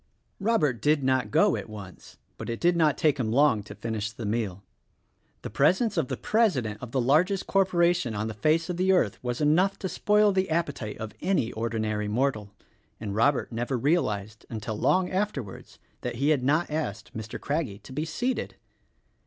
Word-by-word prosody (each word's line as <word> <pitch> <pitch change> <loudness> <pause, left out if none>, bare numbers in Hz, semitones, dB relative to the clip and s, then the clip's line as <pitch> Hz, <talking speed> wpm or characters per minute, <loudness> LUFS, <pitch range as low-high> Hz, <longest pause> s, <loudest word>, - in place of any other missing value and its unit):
Robert 155 - +1
did 150 +1 +2
not 130 -4 +1
go 205 - +4
at - - -6
once; 100 -4 -11 0.2
but - - -6
it 115 - -3
did 175 0 +3
not 155 -5 +3
take 150 -3 +2
him 110 -3 0
long 135 -3 +4
to 100 - -11
finish 110 -2 -3
the 110 0 -7
meal. 100 -3 -2 0.8
The - - -6
presence 185 - +2
of - - 0
the - - -3
president 130 - +1
of 125 -2 -7
the 130 - 0
largest 165 +10 +2
corporation 175 - +2
on 110 +2 -2
the 110 - -4
face 155 +10 +1
of 180 -2 -3
the 185 +1 +3
earth 125 - +1
was 125 +2 -3
enough 175 +7 +3
to 190 - -3
spoil 210 +2 +3
the 190 0 0
appetite 145 -10 -2
of 110 -1 -6
any 180 -12 +1
ordinary 110 -2 -2
mortal; 110 -2 0 0.5
and 105 -3 -4
Robert 130 +7 +2
never 120 +3 -2
realized 110 - 0
until 110 -1 -4
long 185 - +2
afterwards, 185 - -4 0.2
that - - -4
he 140 +5 +1
had 150 -4 +3
not 155 +5 +1
asked 115 -9 -4
Mr. 110 0 -6
Craggie 145 -9 -2
to 120 +5 -13
be 150 +3 -2
seated. 245 +11 -2
135 Hz, 185 wpm, -27 LUFS, 110-170 Hz, 0.8 s, go